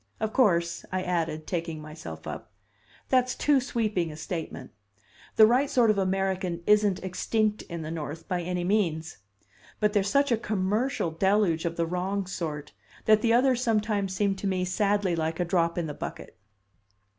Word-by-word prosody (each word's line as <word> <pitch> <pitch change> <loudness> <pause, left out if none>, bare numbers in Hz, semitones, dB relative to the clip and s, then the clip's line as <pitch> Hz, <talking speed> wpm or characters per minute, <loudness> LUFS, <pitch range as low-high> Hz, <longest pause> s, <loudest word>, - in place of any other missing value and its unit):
Of 220 0 -2
course," 170 -9 +2
I 185 0 -1
added, 165 -3 -2
taking 165 -3 -3
myself 155 +1 -9
up, - - -7 0.6
"that's 255 -1 +2
too 290 -2 +3
sweeping 215 - -1
a - - -9
statement. 155 -4 -6 0.6
The 220 - +8
right 255 +5 +3
sort 235 -4 +4
of 205 - 0
American 190 -2 -1
isn't 210 -3 +3
extinct 210 +3 0
in 170 -1 -5
the 155 - -5
North 160 0 -6
by 180 -1 -1
any 180 +1 -2
means. 170 - 0 0.6
But 210 -1 +2
there's 200 -2 +2
such 280 +3 +2
a 235 - +4
commercial 215 -1 -1
deluge 190 -1 +2
of 170 0 -2
the 170 - 0
wrong 185 +3 -2
sort, 155 -5 -5 0.3
that 215 -1 +5
the 230 0 +3
others 250 0 +3
sometimes 210 -5 0
seem 200 0 +1
to 200 - -3
me 185 -1 0
sadly 200 -1 +1
like 160 +1 -2
a 175 - +1
drop 170 -1 +1
in 170 - 0
the 150 - -4
bucket." - - -7
190 Hz, 170 wpm, -27 LUFS, 170-215 Hz, 0.6 s, The